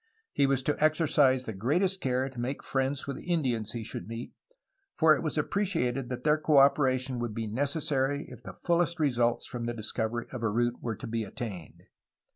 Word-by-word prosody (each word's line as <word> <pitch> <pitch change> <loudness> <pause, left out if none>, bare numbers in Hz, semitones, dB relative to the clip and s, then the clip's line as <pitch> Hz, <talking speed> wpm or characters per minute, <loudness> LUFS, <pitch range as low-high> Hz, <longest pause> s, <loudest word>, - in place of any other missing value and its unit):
He 140 - +3
was 135 -1 +1
to 150 +2 0
exercise 145 -5 +3
the 110 - -4
greatest 175 - 0
care 130 0 0
to 130 -3 -9
make 125 +4 -3
friends 135 +1 -1
with 140 -1 -4
the - - -11
Indians 120 -10 0
he 115 -2 -4
should 105 -4 -6
meet, 115 +2 -6 0.6
for 155 -1 +6
it - - -4
was 155 -1 -2
appreciated 150 -8 0
that 125 -1 -5
their 150 0 +3
co 155 -1 +3
operation 130 -2 +3
would 120 -3 -3
be 115 - -2
necessary 140 +3 -1
if - - -11
the - - -9
fullest 170 0 +2
results 120 -6 +1
from 120 -1 -4
the 120 - -2
discovery 110 +1 -2
of 125 - -5
a 115 - +1
route 120 +3 0
were 115 -2 -3
to - - -8
be 115 0 -2
attained. 100 -5 -7
130 Hz, 200 wpm, -29 LUFS, 120-150 Hz, 0.6 s, for